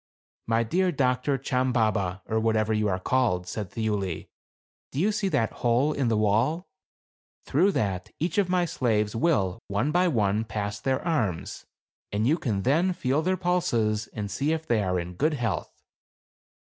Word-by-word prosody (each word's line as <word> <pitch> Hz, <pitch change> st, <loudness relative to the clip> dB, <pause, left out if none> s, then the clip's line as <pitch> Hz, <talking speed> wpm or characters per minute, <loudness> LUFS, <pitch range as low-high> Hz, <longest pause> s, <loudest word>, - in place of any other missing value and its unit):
"My 115 Hz, 0 st, +2 dB
dear 180 Hz, +10 st, +1 dB
doctor, 130 Hz, -1 st, +1 dB
Chambaba, 110 Hz, -8 st, 0 dB
or 110 Hz, -, 0 dB
whatever 110 Hz, -1 st, +1 dB
you 105 Hz, 0 st, +1 dB
are 95 Hz, -, 0 dB
called," 95 Hz, -3 st, +1 dB
said 100 Hz, +1 st, -5 dB
Thiuli, 105 Hz, -6 st, -2 dB, 0.6 s
"do 135 Hz, -, -3 dB
you 200 Hz, +6 st, +3 dB
see 210 Hz, -1 st, -1 dB
that 115 Hz, -, +1 dB
hole 125 Hz, +5 st, +2 dB
in 135 Hz, -4 st, 0 dB
the 115 Hz, -2 st, +2 dB
wall? 115 Hz, -, +1 dB, 0.8 s
through 185 Hz, +8 st, +3 dB
that 95 Hz, -3 st, -1 dB
each 180 Hz, +6 st, 0 dB
of 190 Hz, -3 st, +1 dB
my 180 Hz, -1 st, +2 dB
slaves 110 Hz, -9 st, 0 dB
will, 115 Hz, -, +1 dB
one 105 Hz, +9 st, 0 dB
by 180 Hz, +3 st, +3 dB
one, 110 Hz, -, +1 dB
pass 105 Hz, -2 st, -4 dB
their 130 Hz, +2 st, -1 dB
arms, 110 Hz, -, -2 dB, 0.4 s
and 105 Hz, +2 st, 0 dB
you 155 Hz, +7 st, +2 dB
can 105 Hz, -9 st, -1 dB
then 165 Hz, +8 st, +2 dB
feel 140 Hz, -2 st, 0 dB
their 185 Hz, +3 st, 0 dB
pulses 115 Hz, -, 0 dB
and 105 Hz, -2 st, -5 dB
see 140 Hz, +10 st, 0 dB
if 160 Hz, 0 st, -3 dB
they 115 Hz, -6 st, +2 dB
are 90 Hz, -2 st, 0 dB
in 85 Hz, +1 st, -5 dB
good 150 Hz, -, +1 dB
health." 115 Hz, -, -2 dB
115 Hz, 170 wpm, -26 LUFS, 105-155 Hz, 0.8 s, you